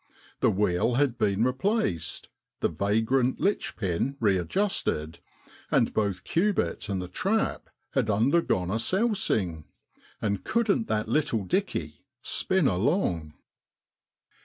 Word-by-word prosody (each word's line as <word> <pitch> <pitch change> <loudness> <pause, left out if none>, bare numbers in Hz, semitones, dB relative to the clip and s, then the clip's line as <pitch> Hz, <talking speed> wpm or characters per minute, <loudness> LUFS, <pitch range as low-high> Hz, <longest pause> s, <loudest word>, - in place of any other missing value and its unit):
The - - +4
wheel 100 +4 +1
had 130 -3 +1
been 100 +1 +2
replaced, 130 - -1 0.3
the - - +1
vagrant 110 - +1
litch 200 +2 0
pin 100 +8 -1
readjusted, 95 - 0 0.5
and - - +2
both 100 -4 -1
Cubitt 170 - 0
an.d 95 -2 -2
the - - -9
trap 195 - -1 0.2
had 125 -5 0
undergone 110 - +2
a 110 - 0
sousing. 115 - 0 0.5
And 100 -2 -1
couldn't 230 -1 +1
that 105 0 -1
little 115 -4 +1
' - - -9
dickey 195 +2 -1
' - - -62 0.2
spin 185 -6 +2
along 90 - 0
110 Hz, 120 wpm, -27 LUFS, -, 0.5 s, The